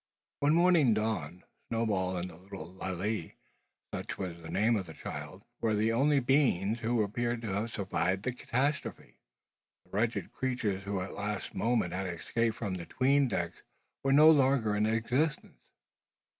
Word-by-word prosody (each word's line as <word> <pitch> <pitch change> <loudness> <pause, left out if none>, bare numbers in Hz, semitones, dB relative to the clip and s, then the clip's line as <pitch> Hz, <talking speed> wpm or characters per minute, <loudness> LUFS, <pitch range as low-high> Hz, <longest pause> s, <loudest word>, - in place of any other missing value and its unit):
When 145 +2 +3
morning 170 -9 +5
dawned, 100 -6 -2 0.3
Snowball 100 -5 0
and 90 +1 -4
the - - -13
little 90 -1 -10
Lalee 95 0 -3 0.6
such - - -4
was 90 -3 -5
the 80 - -9
name 110 +6 +2
of 95 -4 -2
the 80 - -10
child - - -7 0.2
were 110 -2 +1
the 110 +2 +2
only 140 +4 +3
beings 120 -6 +2
who 115 -1 +1
appeared 120 +3 -1
to 110 - -3
have 100 +4 -1
survived 95 -1 -1
the 130 - 0
catastrophe, 135 +4 -2 0.7
the - - -28
wretched 115 +3 -1
creatures 110 -7 -2
who 100 -1 -2
at 95 - -4
the - - -9
last 105 0 -3
moment 115 -7 +1
had 95 +1 -2
escaped 115 +6 -1
from 100 -5 -3
the 85 -2 -5
"'tween 140 +5 +3
decks" 85 -8 -3 0.4
were 135 - +2
no 155 +3 +8
longer 130 -7 +3
in 105 +1 +2
existence. 125 +8 -1
110 Hz, 165 wpm, -31 LUFS, 95-125 Hz, 0.7 s, no